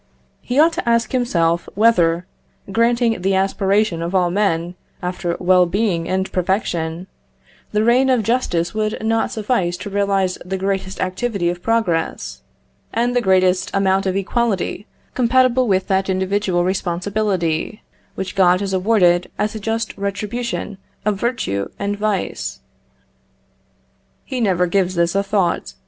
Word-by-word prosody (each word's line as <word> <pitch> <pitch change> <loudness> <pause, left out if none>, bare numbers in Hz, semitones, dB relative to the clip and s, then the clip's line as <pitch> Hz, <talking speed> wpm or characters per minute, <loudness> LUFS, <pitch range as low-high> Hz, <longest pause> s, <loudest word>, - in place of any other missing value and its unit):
He 250 - -3
ought 330 +2 +5
to 235 - -2
ask 235 -1 +2
himself 170 -10 +1
whether, 180 -6 +3 0.5
granting 230 -1 +2
the 190 +1 +1
aspiration 195 -1 +1
of 170 +3 -3
all 180 -2 +2
men 175 -3 0 0.3
after 180 -1 -3
well 180 0 +4
being 180 -3 0
and 190 0 -1
perfection, 175 -2 -1 0.7
the 210 0 +1
reign 250 +3 +4
of 250 -4 +3
justice 180 -8 0
would 215 0 -2
not 225 0 +1
suffice 205 -6 -1
to 205 - -7
realise 195 -2 0
the 190 +2 -3
greatest 190 0 -2
activity 185 -1 -1
of 175 0 -8
progress, 175 - -1 0.5
and 240 +2 0
the 245 - +3
greatest 185 -2 +2
amount 195 0 +2
of 190 - 0
equality 205 0 -1 0.3
compatible 255 0 +3
with 190 -2 +2
that 190 0 +1
individual 190 -1 0
responsibility 185 0 -1 0.3
which 190 -1 -4
God 180 -2 +4
has 195 -1 -3
awarded 180 -3 +3
as 210 0 -1
a 220 - -5
just 225 +1 -2
retribution 210 +1 -3 0.3
of 210 -2 0
virtue 150 - -1
and 200 0 -2
vice? 205 -2 -2 1.7
He 260 -2 -3
never 185 -5 +2
gives 185 0 0
this 170 0 +1
a 195 - +2
thought. 195 - -1
195 Hz, 140 wpm, -19 LUFS, 180-220 Hz, 1.7 s, ought